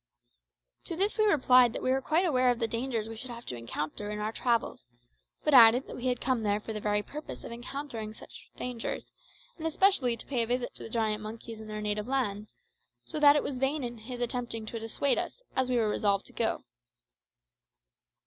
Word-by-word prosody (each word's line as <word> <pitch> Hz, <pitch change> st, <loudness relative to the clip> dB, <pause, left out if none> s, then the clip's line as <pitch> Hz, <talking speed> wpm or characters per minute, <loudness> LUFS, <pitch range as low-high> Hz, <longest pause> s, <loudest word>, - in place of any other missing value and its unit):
To 335 Hz, -, -3 dB
this 400 Hz, +6 st, +1 dB
we 430 Hz, -, +5 dB
replied 255 Hz, -, +5 dB
that -, -, -5 dB
we 255 Hz, -, +2 dB
were 265 Hz, +1 st, +2 dB
quite 320 Hz, +7 st, +2 dB
aware 255 Hz, -6 st, +3 dB
of 245 Hz, -, +2 dB
the 230 Hz, -1 st, 0 dB
dangers 230 Hz, -1 st, -2 dB
we 225 Hz, -, -7 dB
should 250 Hz, +3 st, -8 dB
have 235 Hz, 0 st, -8 dB
to 125 Hz, -, -4 dB
encounter 150 Hz, -, -4 dB
in 210 Hz, -, -3 dB
our 210 Hz, +1 st, -2 dB
travels, 235 Hz, -, -1 dB, 0.6 s
but 300 Hz, -, +2 dB
added 245 Hz, +1 st, +8 dB
that -, -, -8 dB
we 250 Hz, -, -3 dB
had 250 Hz, -1 st, +1 dB
come 255 Hz, -3 st, 0 dB
there 205 Hz, -1 st, +1 dB
for 220 Hz, +1 st, -6 dB
the 215 Hz, -, -4 dB
very 210 Hz, 0 st, +1 dB
purpose 300 Hz, +6 st, -8 dB
of -, -, -8 dB
encountering 235 Hz, -3 st, -5 dB
such -, -, -12 dB
dangers, 245 Hz, -2 st, -4 dB, 0.5 s
and 325 Hz, -, -2 dB
especially 315 Hz, -8 st, +3 dB
to -, -, -10 dB
pay 255 Hz, -4 st, 0 dB
a 230 Hz, -, 0 dB
visit 245 Hz, +1 st, -1 dB
to -, -, -12 dB
the -, -, -7 dB
giant 220 Hz, -2 st, 0 dB
monkeys 220 Hz, +1 st, -8 dB
in 220 Hz, -, -9 dB
their 215 Hz, 0 st, -5 dB
native 210 Hz, +1 st, -1 dB
land, 215 Hz, -6 st, -1 dB, 0.6 s
so 305 Hz, -, -4 dB
that 290 Hz, -1 st, +8 dB
it 295 Hz, -, +2 dB
was 270 Hz, -, -3 dB
in -, -, -6 dB
vain 270 Hz, -3 st, -1 dB
his 245 Hz, +2 st, -7 dB
attempting 240 Hz, -2 st, -3 dB
to 230 Hz, +1 st, -5 dB
dissuade 225 Hz, +5 st, +1 dB
us, -, -, -5 dB
as 260 Hz, -1 st, +1 dB
we 250 Hz, -, +2 dB
were 220 Hz, -2 st, +2 dB
resolved 200 Hz, -1 st, +1 dB
to -, -, -11 dB
go. -, -, 0 dB
240 Hz, 215 wpm, -30 LUFS, 215-265 Hz, 0.6 s, added